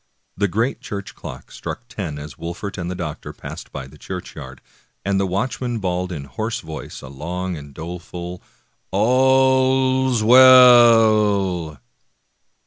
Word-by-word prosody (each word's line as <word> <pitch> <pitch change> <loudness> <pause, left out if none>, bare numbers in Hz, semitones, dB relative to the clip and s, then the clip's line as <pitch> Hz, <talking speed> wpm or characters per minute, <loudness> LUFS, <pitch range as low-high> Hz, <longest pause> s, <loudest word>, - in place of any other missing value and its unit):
The 100 +1 +1
great 115 +8 -1
church 100 -1 -7
clock - - -10
struck - - -7
ten 75 - -6
as 75 -1 -8
Wolfert 90 - -6
and 85 0 -4
the 90 - -4
doctor 80 -4 -6
passed - - -10
by 65 - -6
the 65 - -16
churchyard, 65 0 -8 0.5
and 100 0 +1
the 95 - 0
watchman 120 +5 -2
bawled 90 -2 -2
in 75 -5 -5
hoarse 110 - -4
voice 80 -1 -9
a - - -8
long 90 +7 -5
and 70 -2 -10
doleful 90 +3 -8 0.3
" - - -46
All's 130 +2 +3
well! 110 - +6
95 Hz, 135 wpm, -21 LUFS, 85-120 Hz, 0.5 s, well